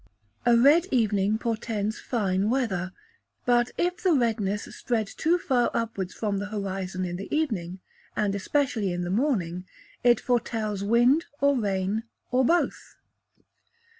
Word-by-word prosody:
A 235 -1 +6
red 295 +9 +5
evening 210 -4 +2
portends 220 -2 -2
fine 200 -4 0
weather; 200 -8 -1 0.5
but 245 0 +3
if 355 +1 -1
the 365 -2 +3
redness 215 -6 0
spread 230 -3 -1
too 325 - +1
far 255 -9 +1
upwards 200 -5 -2
from 205 -3 -2
the 205 - -4
horizon 195 -3 -3
in 175 0 -4
the 195 - -6
evening, 190 - -2 0.3
and 205 -2 0
especially 215 -1 0
in 175 0 -2
the 175 - -3
morning, 190 - 0 0.4
it 240 -2 +5
foretells 220 -4 -1
wind 240 +9 +4
or 280 0 +3
rain, 200 -2 0 0.3
or 255 +1 +3
both. 340 +7 0
220 Hz, 135 wpm, -26 LUFS, 195-250 Hz, 0.5 s, A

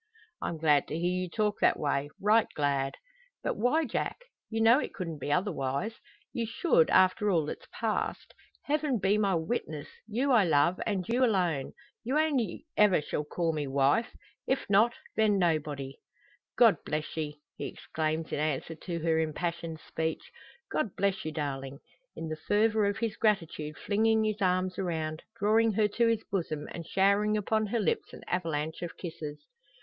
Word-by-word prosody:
"I'm 165 - -2
glad 150 -3 +3
to 155 - -3
hear 175 +2 0
you 180 - -3
talk 210 +2 0
that - - +4
way 145 -1 -1
right 215 +2 +4
glad." 140 -2 0 0.5
"But - - -1
why, 275 +9 +2
Jack? 235 - -2 0.3
You 225 - -2
know 230 +4 +6
it - - -5
couldn't 165 -7 -5
be 145 - -3
otherwise! 180 +3 -1 0.3
You 230 -2 -2
should 230 - +3
after 185 +3 +4
all 165 -6 +2
that's - - -7
passed. - - -2 0.3
Heaven 295 -3 +1
be 200 +2 +2
my 200 -3 +2
witness! 160 -4 -3 0.2
you 250 +6 0
I 235 -5 +6
love, 165 +1 +3
and 190 -4 -1
you 245 +3 +2
alone. 180 - +1 0.3
You 260 +5 0
only 285 - 0
shall - - +6
ever 185 -7 +4 0.2
call 165 +1 -1
me 150 -2 -2
wife. 140 - +2 0.3
If 265 +1 0
not 220 +4 +5 0.2
then 215 -2 +3
nobody!" 150 -6 -1 0.6
"God - - +6
bless 150 0 -3
ye!" 150 -2 -4 0.2
he - - -4
exclaims 155 0 -3
in - - -1
answer 155 +1 -1
to 170 +2 -5
her 160 -1 +2
impassioned 165 +1 -2
speech. 160 0 -3 0.4
"God 225 -11 -1
bless 195 -1 0
you, 155 - -2
darling!" 140 -3 -4 0.4
in 165 - -5
the 155 0 -4
fervour 215 0 +3
of 200 0 -1
his 225 -2 -2
gratitude 165 -8 0
flinging 220 +1 +2
his 215 -1 -1
arms 185 0 +1
around, 160 -4 -2 0.2
drawing 220 +1 +3
her 210 +1 +3
to 235 +3 +2
his 225 -1 +1
bosom, 160 -6 -3
and 170 -1 -7
showering 200 +3 +3
upon 215 +1 0
her 230 +3 0
lips 210 - -1
an - - -10
avalanche 160 -3 -2
of 175 -1 -6
kisses. 160 -4 -7
185 Hz, 170 wpm, -30 LUFS, 155-215 Hz, 0.6 s, know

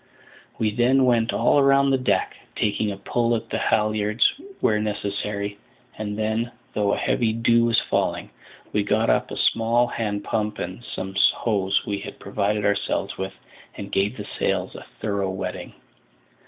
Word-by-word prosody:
We 110 -1 +1
then 130 +3 +3
went 120 -2 +3
all 145 - +3
round 140 0 +4
the - - +4
deck, 130 - 0 0.2
taking 105 0 0
a 100 - -6
pull 120 +3 0
at 115 0 -5
the - - -1
halliards 105 0 +2 0.3
where 105 -1 +2
necessary; 100 -1 -3 0.4
and 105 -1 -4
then, 110 +2 -1 0.2
though 100 -1 +1
a - - 0
heavy 115 -2 +1
dew 115 +1 +3
was 115 0 +4
falling, - - -1 0.4
we 105 - +2
got 105 +2 +2
up - - +1
a - - -6
small 115 +2 +3
hand 105 -4 -3
pump 105 -1 -2
and 90 +7 -6
some 95 -4 -6 0.2
hose 100 -4 0
we 100 -1 -2
had - - -8
provided 105 +1 -1
ourselves 100 - 0
with, 95 0 -3 0.4
and 100 - -7
gave 100 +5 0
the 105 - -6
sails - - 0
a - - -10
thorough 100 -2 -1
wetting. 95 -1 -5
105 Hz, 165 wpm, -24 LUFS, 100-115 Hz, 0.4 s, round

